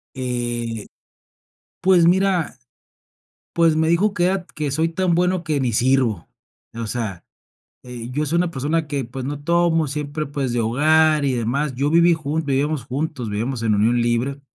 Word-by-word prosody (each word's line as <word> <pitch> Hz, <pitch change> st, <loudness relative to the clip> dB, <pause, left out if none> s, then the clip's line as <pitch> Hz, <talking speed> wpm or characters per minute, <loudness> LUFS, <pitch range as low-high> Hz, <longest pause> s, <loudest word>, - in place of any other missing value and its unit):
Eh, 120 Hz, -3 st, -3 dB, 0.9 s
pues, 180 Hz, -2 st, +4 dB
mira, 185 Hz, -2 st, +2 dB, 1.0 s
pues, 165 Hz, -2 st, +3 dB
me 160 Hz, 0 st, +2 dB
dijo 195 Hz, +5 st, +2 dB
que 175 Hz, -3 st, 0 dB
era 190 Hz, -1 st, 0 dB
que 150 Hz, -2 st, -2 dB
soy 160 Hz, +3 st, +1 dB
tan 175 Hz, +1 st, 0 dB
bueno 180 Hz, 0 st, +1 dB
que 150 Hz, -4 st, -1 dB
ni 125 Hz, -3 st, 0 dB
sirvo. 120 Hz, -6 st, +1 dB, 0.5 s
O 115 Hz, -1 st, -4 dB
sea, 105 Hz, -6 st, -4 dB, 0.6 s
eh, 120 Hz, -1 st, -8 dB
yo 150 Hz, +3 st, -1 dB
soy 170 Hz, +4 st, 0 dB
una 175 Hz, -1 st, +1 dB
persona 150 Hz, +2 st, -1 dB
que, 140 Hz, -3 st, -2 dB
pues, 125 Hz, +2 st, -7 dB
no 145 Hz, +1 st, -4 dB
tomo, 170 Hz, 0 st, +2 dB
siempre, 150 Hz, +2 st, -4 dB
pues, 140 Hz, -3 st, -3 dB
de 120 Hz, -, 0 dB
hogar 155 Hz, +6 st, +3 dB
y 135 Hz, -2 st, +1 dB
demás. 125 Hz, +4 st, -1 dB
Yo 140 Hz, +3 st, 0 dB
viví 170 Hz, +1 st, +5 dB
jun 155 Hz, +1 st, -3 dB
vivíamos 140 Hz, -1 st, -1 dB
juntos, 130 Hz, -3 st, -4 dB
vivíamos 115 Hz, +3 st, -3 dB
en 110 Hz, -2 st, +2 dB
unión 115 Hz, +4 st, +2 dB
libre. 120 Hz, +4 st, -1 dB
145 Hz, 170 wpm, -21 LUFS, 120-165 Hz, 1.0 s, viví